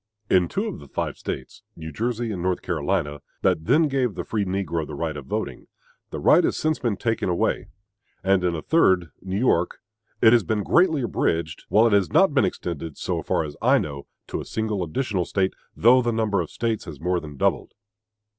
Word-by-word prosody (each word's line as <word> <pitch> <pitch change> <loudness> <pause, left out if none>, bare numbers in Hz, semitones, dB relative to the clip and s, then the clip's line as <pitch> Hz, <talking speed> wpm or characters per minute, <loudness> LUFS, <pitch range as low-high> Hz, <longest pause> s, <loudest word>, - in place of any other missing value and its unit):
In 90 -2 +4
two - - -2
of - - -5
the 70 - -13
five - - -3
States 65 - -6
New 80 -1 -7
Jersey 120 +2 -2
and 95 -4 -4
North 90 0 -1
Carolina 80 -3 -1 0.2
that 80 - +2
then 160 - +4
gave 130 -7 0
the - - -3
free 105 -3 -1
negro 90 -4 -2
the 75 - -7
right 80 +1 -3
of 70 -3 -8
voting, - - -4 0.4
the - - -5
right - - +5
has - - 0
since 155 0 0
been 115 -6 -1
taken 115 -4 -1
away; 85 - 0 0.6
and 95 -1 +3
in 90 -1 +1
a 80 - -5
third 95 - +3
New 95 +1 -3
York 100 -7 +1 0.4
it 115 0 +6
has 120 -3 +5
been 105 +3 -1
greatly 160 - +3
abridged; 80 -8 -1
while 110 +2 +5
it 115 - +3
has 100 -2 +3
not 190 -6 +4
been 130 -7 +4
extended, 85 -4 -4
so - - -2
far - - 0
as 75 -2 -7
I - - +5
know, 70 -1 -4 0.2
to - - -3
a - - -8
single 110 -3 -2
additional 95 +2 -1
State, 95 +1 0 0.2
though 125 +4 +6
the 120 -1 0
number 110 -4 +1
of 85 - -4
the - - -18
States 115 -2 -2
has 80 -6 -9
more 90 +2 0
than 75 -3 -10
doubled. - - 0
95 Hz, 210 wpm, -24 LUFS, 80-115 Hz, 0.6 s, it